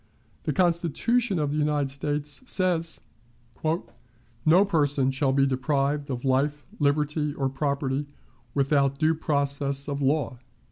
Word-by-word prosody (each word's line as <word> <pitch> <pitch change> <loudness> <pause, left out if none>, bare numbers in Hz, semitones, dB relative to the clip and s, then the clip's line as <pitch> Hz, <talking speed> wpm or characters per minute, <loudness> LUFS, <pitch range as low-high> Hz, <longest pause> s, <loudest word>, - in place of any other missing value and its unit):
The - - +1
Constitution 185 - +1
of 150 -2 0
the 150 - -1
United 145 -2 +1
States 145 +1 -3
says: 170 -3 0 0.6
"No 155 - 0
person 145 -7 +2
shall 135 0 +1
be 135 0 +3
deprived 140 +2 0
of 125 -1 -4
life, 145 +3 +1
liberty, 150 +1 +1
or 135 -1 0
property, 140 0 -1 0.5
without 140 -1 +2
due 160 +1 +3
process 140 -2 -1
of 140 -1 -3
law." 140 -2 0
145 Hz, 125 wpm, -26 LUFS, 135-155 Hz, 0.6 s, be